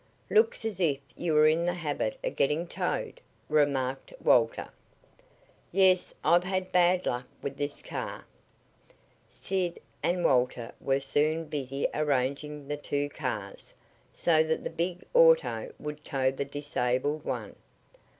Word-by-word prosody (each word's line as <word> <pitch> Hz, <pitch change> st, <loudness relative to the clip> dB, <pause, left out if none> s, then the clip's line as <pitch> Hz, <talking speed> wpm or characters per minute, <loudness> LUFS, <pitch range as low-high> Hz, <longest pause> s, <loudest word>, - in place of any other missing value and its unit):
"Looks 440 Hz, -, +3 dB
as 210 Hz, -5 st, -3 dB
if 155 Hz, -6 st, +2 dB, 0.2 s
you 165 Hz, -3 st, -1 dB
were 150 Hz, 0 st, +7 dB
in 165 Hz, +2 st, +2 dB
the 175 Hz, -, 0 dB
habit 145 Hz, -10 st, -2 dB
of -, -, -2 dB
getting 150 Hz, +5 st, +1 dB
towed," -, -, -3 dB, 0.3 s
remarked 135 Hz, -3 st, +1 dB
Walter. 115 Hz, -2 st, +3 dB, 1.0 s
"Yes. 185 Hz, -1 st, +4 dB
I've 175 Hz, +3 st, +5 dB
had 185 Hz, 0 st, -2 dB
bad 180 Hz, 0 st, +4 dB
luck 125 Hz, +1 st, -2 dB, 0.2 s
with 140 Hz, -1 st, -3 dB
this 145 Hz, 0 st, -4 dB
car." -, -, -5 dB, 1.0 s
Sid 185 Hz, -3 st, -2 dB, 0.2 s
and 175 Hz, 0 st, 0 dB
Walter 125 Hz, -2 st, +2 dB
were 135 Hz, 0 st, +1 dB
soon 155 Hz, +4 st, +1 dB
busy 140 Hz, -3 st, -2 dB
arranging 145 Hz, 0 st, -1 dB
the 145 Hz, 0 st, -2 dB
two 145 Hz, 0 st, -2 dB
cars, 110 Hz, -9 st, -5 dB, 0.4 s
so 160 Hz, -2 st, +3 dB
that 160 Hz, 0 st, 0 dB
the -, -, -4 dB
big 175 Hz, +2 st, -2 dB
auto -, -, +4 dB
would 150 Hz, 0 st, -7 dB
tow 135 Hz, -3 st, +1 dB
the 135 Hz, +1 st, -3 dB
disabled 145 Hz, 0 st, -1 dB
one. -, -, -4 dB
150 Hz, 135 wpm, -29 LUFS, 135-175 Hz, 1.0 s, were